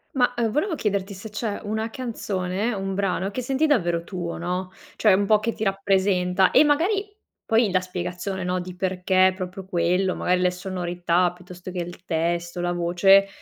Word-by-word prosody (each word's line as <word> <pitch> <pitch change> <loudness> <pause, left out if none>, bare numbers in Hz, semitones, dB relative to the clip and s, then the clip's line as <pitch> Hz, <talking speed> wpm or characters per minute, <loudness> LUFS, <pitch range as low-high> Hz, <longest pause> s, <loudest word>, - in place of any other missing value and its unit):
Ma, 245 -1 +3
uhm, 230 -2 +1
volevo 320 - 0
chiederti 200 -4 -2
se 195 +3 -9
c'è 215 0 -3
una 220 +2 -2
canzone, 215 -3 -3
un 195 -1 -3
brano 195 -1 0
che 230 +5 -4
senti 270 +5 +1
davvero 175 - +1
tuo, 175 -2 -5
no, 180 +2 -3 0.2
cioè 210 -3 +4
un 200 +2 +2
po' 210 +1 +4
che 230 +2 -2
ti - - -5
rappresenta 190 -2 +2
e - - +7
magari 390 +8 +1 0.3
poi 225 -1 +3
la 185 - +2
spiegazione, 180 +1 -4
no, 180 0 -1
di 180 0 -7
perché 185 0 +2
proprio 185 0 -6
quello, 180 +1 +1
magari 180 0 +1
le 180 0 +3
sonorità 180 -1 0
piuttosto 180 0 -10
che 180 - -4
il 175 0 -6
testo, 170 +1 -1
la 175 0 0
voce, 175 +3 +4
190 Hz, 180 wpm, -24 LUFS, 180-210 Hz, 0.3 s, e